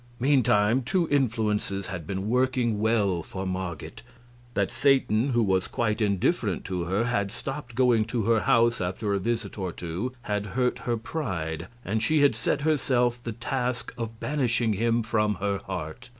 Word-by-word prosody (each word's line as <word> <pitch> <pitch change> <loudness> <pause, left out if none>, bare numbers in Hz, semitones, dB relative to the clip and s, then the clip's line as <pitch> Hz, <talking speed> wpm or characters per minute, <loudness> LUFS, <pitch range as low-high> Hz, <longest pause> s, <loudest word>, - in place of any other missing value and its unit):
Meantime 125 -3 +3
two 170 +6 0
influences 110 -7 0
had 90 -4 -6
been 95 +1 -3
working 125 -2 +1
well 105 -5 +2
for 95 +3 -6
Marget. 95 -3 -5 0.5
That 100 -1 +1
Satan, 135 -3 +3
who 120 -1 +3
was 95 -2 +1
quite 110 -1 -1
indifferent 100 -3 +1
to 90 -2 -2
her, 95 +6 +1
had 100 -5 0
stopped 135 0 -6
going 120 -3 +4
to 115 0 -2
her 115 +1 +3
house 120 -2 +3
after 100 +4 -1
a 100 - +1
visit 115 +1 -3
or 95 -2 -2
two 90 +10 -4
had 105 0 -2
hurt 125 -1 +1
her 120 - +2
pride, 90 - -4 0.2
and 110 +3 0
she 155 +6 +3
had 145 -3 +5
set 115 +6 -1
herself 125 -5 +1
the 115 - -4
task 125 +1 -3
of 115 -2 -5
banishing 120 -6 +1
him 115 +3 +1
from 105 -2 +1
her 100 +1 -1
heart. 90 +3 -5
110 Hz, 165 wpm, -27 LUFS, 100-125 Hz, 0.5 s, had